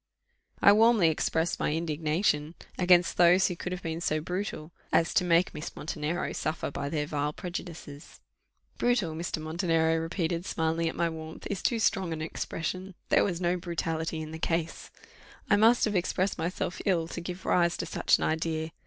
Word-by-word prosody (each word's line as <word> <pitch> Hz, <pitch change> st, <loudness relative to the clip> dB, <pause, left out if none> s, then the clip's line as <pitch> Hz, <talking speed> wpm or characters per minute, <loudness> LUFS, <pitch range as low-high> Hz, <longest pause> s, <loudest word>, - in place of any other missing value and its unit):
I 200 Hz, -, +9 dB
warmly 220 Hz, -4 st, +5 dB
expressed 160 Hz, +1 st, 0 dB
my -, -, 0 dB
indignation 155 Hz, 0 st, 0 dB, 0.2 s
against 180 Hz, -1 st, +4 dB
those 180 Hz, +2 st, +6 dB
who 180 Hz, -, -3 dB
could 180 Hz, -, -5 dB
have 180 Hz, 0 st, -5 dB
been 165 Hz, 0 st, -3 dB
so 155 Hz, -2 st, 0 dB
brutal 180 Hz, -1 st, -4 dB, 0.2 s
as 165 Hz, -, +2 dB
to -, -, +3 dB
make 175 Hz, 0 st, +3 dB
Miss 150 Hz, -, -7 dB
Montenero 155 Hz, +2 st, -3 dB
suffer 155 Hz, -1 st, -3 dB
by 140 Hz, -, -4 dB
their 150 Hz, -1 st, -1 dB
vile 150 Hz, 0 st, -2 dB
prejudices. 170 Hz, -4 st, -8 dB, 0.6 s
"Brutal," 240 Hz, -10 st, +1 dB
Mr. 165 Hz, 0 st, -3 dB
Montenero 165 Hz, 0 st, +1 dB
repeated, 170 Hz, +1 st, -2 dB
smiling 165 Hz, 0 st, 0 dB
at -, -, -7 dB
my 170 Hz, -, +1 dB
warmth, 160 Hz, -1 st, -7 dB
"is 200 Hz, -, -3 dB
too 235 Hz, -, +1 dB
strong 190 Hz, -6 st, +1 dB
an 160 Hz, -, -5 dB
expression: 185 Hz, +3 st, -4 dB
there -, -, +5 dB
was 175 Hz, -4 st, -1 dB
no 180 Hz, 0 st, +1 dB
brutality 165 Hz, -2 st, -3 dB
in 155 Hz, -, -8 dB
the 160 Hz, -, -7 dB
case. 165 Hz, 0 st, -2 dB, 0.6 s
I -, -, +7 dB
must 225 Hz, +4 st, +5 dB
have 210 Hz, -2 st, -1 dB
expressed 185 Hz, +1 st, 0 dB
myself 175 Hz, +2 st, -3 dB
ill 170 Hz, -4 st, +2 dB
to 175 Hz, -, -5 dB
give 180 Hz, +1 st, -7 dB
rise 170 Hz, -1 st, +2 dB
to -, -, -3 dB
such -, -, +2 dB
an -, -, -4 dB
idea. 160 Hz, 0 st, -1 dB
170 Hz, 180 wpm, -28 LUFS, 160-180 Hz, 0.6 s, I